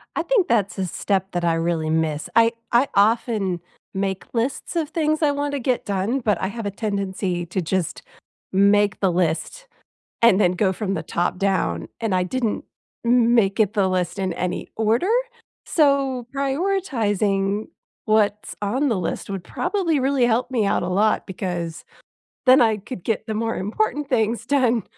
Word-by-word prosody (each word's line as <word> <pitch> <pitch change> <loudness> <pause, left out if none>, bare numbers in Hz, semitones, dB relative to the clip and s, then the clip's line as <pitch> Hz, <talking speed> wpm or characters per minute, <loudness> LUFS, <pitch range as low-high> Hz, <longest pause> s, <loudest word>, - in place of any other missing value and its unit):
I - - 0
think 470 -8 +2
that's 210 -4 +1
a 190 - -1
step 190 +2 -1
that 175 -1 -2
I 170 - +3
really 165 -1 -1
miss. 160 -1 -1
I 230 +1 +5 0.2
I 240 +4 +4
often 205 -3 +2 0.3
make 190 -1 -2
lists 245 +8 -2
of 320 -3 0
things 310 -1 0
I 295 - +4
want 285 0 -2
to 285 - -1
get 250 0 -1
done, 200 +6 0
but 210 -7 0
I 190 - 0
have 225 +2 -6
a 205 - -1
tendency 195 -4 -2
to 185 +3 -2
just 180 0 -2 0.5
make 200 +1 +3
the 190 -2 +2
list 175 - -1 0.5
and 230 -4 +6
then 180 -4 +4
go 190 +1 +1
from 195 0 -2
the - - -3
top 175 +1 -1
down. 180 - 0
And 225 -4 -1
I 185 - +2
didn't 230 +3 -2 0.4
m 235 0 +4
make 195 -3 +2
it 210 -1 +3
the 200 -3 +2
list 185 +1 -1
in 185 -2 -1
any 180 +1 -3
order. 225 - +1 0.6
So, 275 -5 +2
prioritizing 225 - 0 0.4
what's 210 -1 +1
on 255 +8 0
the 220 -5 0
list 175 - -4
would 195 -3 -4
probably 335 - -1
really 265 -1 +2
help 240 +2 +1
me 230 -5 +1
out - - +1
a 175 - -2
lot 210 +4 +2
because 175 -3 -4 0.6
then 255 +2 +7
I 220 -3 +3
could 200 -2 -8
get 220 -1 -1
the 220 - -3
more 225 +1 -1
important 290 - -1
things 230 -3 0
done 250 -6 +2
210 Hz, 175 wpm, -22 LUFS, 190-250 Hz, 0.6 s, then